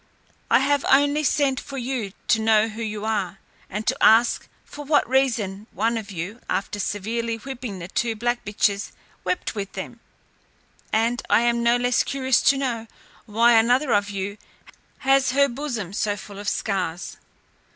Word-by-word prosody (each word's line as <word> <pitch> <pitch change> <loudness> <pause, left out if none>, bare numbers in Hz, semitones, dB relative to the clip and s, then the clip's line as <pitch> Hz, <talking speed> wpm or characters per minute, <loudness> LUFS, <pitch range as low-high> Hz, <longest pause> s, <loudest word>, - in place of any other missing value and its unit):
I - - +5
have 285 0 +2
only 285 +2 +4
sent 275 -2 +2
for 275 - -8
you 245 -5 -3 0.2
to 220 - +4
know 220 0 +3
who 220 +1 -7
you 215 -1 -4
are, 200 -4 -1 0.3
and 210 +3 -4
to - - +1
ask 230 +2 +5 0.2
for 295 - -9
what 290 +1 +2
reason 230 -6 0
one 225 +4 0
of 220 -2 -5
you, 190 +5 -6
after 200 +1 -2
severely 225 +4 -2
whipping 245 -4 -7
the 170 -1 -7
two 225 +4 -1
black 240 +2 -1
bitches, 205 0 0 0.3
wept 365 - -2
with 200 -3 -5
them? 215 +5 -7 0.9
And 230 +3 +1
I - - +5
am 235 0 +1
no 235 +1 +3
less 245 0 +2
curious 265 -2 +1
to 275 - +3
know, 240 -4 -2 0.4
why 230 +3 +4
another 245 +4 +4
of 205 0 +2
you 200 +1 -4 0.7
has 270 -1 +4
her 280 +1 +4
bosom 240 -8 -4
so 205 0 -1
full 200 0 -10
of 205 - -2
scars." 185 -4 -3
230 Hz, 165 wpm, -23 LUFS, 205-260 Hz, 0.9 s, I